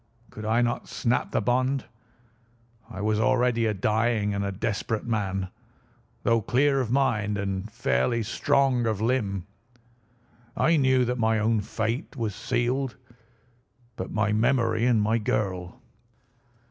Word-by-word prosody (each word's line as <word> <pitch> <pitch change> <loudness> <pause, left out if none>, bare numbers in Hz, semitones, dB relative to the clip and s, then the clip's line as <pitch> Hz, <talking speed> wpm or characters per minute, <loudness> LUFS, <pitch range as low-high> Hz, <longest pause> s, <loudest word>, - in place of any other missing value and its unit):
Could 110 - -8
I 115 +3 +2
not 120 0 -2
snap 120 -2 -1
the - - 0
bond? 130 +2 +1 1.0
I 95 - -7
was 105 0 +1
already 120 0 +2
a 110 - +1
dying 110 +1 +1
and 100 0 -1
a 100 - -2
desperate 105 +2 -2
man. 95 -5 -2 0.7
Though 115 -1 +3
clear 135 +5 +2
of 120 - -3
mind 110 -6 +1
and 100 +1 -3
fairly 85 - 0
strong 120 +2 +1
of 110 -3 -1
limb, 105 -6 0 1.1
I 165 - +3
knew 130 -3 +3
that 125 +1 -2
my 110 0 +2
own 110 0 +1
fate 115 - -3
was 115 -5 -2
sealed. 125 +3 -1 1.0
But 125 - -5
my 110 -1 +1
memory 115 +1 +2
and 120 -3 +3
my 110 +2 +2
girl! 95 -4 -2
115 Hz, 135 wpm, -26 LUFS, 105-125 Hz, 1.1 s, Though